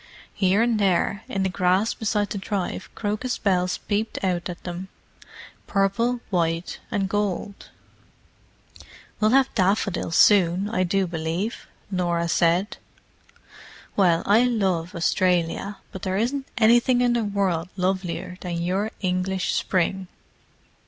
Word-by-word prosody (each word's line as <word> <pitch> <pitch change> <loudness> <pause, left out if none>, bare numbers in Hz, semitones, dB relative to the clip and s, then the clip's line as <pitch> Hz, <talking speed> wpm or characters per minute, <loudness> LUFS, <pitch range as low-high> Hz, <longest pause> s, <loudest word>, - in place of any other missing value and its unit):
Here 195 +3 +2
and 235 -2 +1
there, 200 +1 +1
in 195 - -1
the - - +2
grass 185 +4 +1
beside 210 -2 -1
the 200 - -2
drive 195 -2 -3
crocus 215 +4 -2
bells 180 -3 +1
peeped 215 +2 -2
out 180 -1 -1
at 175 - -8
them—purple, 195 +5 -4
white 165 -1 -1
and 200 -3 0
gold. 200 0 -3 1.5
"We'll 215 - +3
have 270 +2 +3
daffodils 190 -4 0
soon, 190 -1 +5
I 230 - 0
do 195 +2 +1
believe," 170 +5 -3 0.2
Norah 170 -2 0
said. 175 +5 +2 1.2
"Well, 175 -4 +3
I 215 +4 +5
love 190 -7 0
Australia, 180 +3 0
but 190 - -8
there 190 0 -1
isn't 265 +5 -1
anything 240 +2 +4
in 245 -1 +3
the 235 -1 +1
world 190 -5 -1
lovelier 185 -1 -2
than 175 -2 -3
your 190 +5 -1
English 185 0 -1
spring!" 190 +1 0
190 Hz, 125 wpm, -24 LUFS, 180-210 Hz, 1.5 s, soon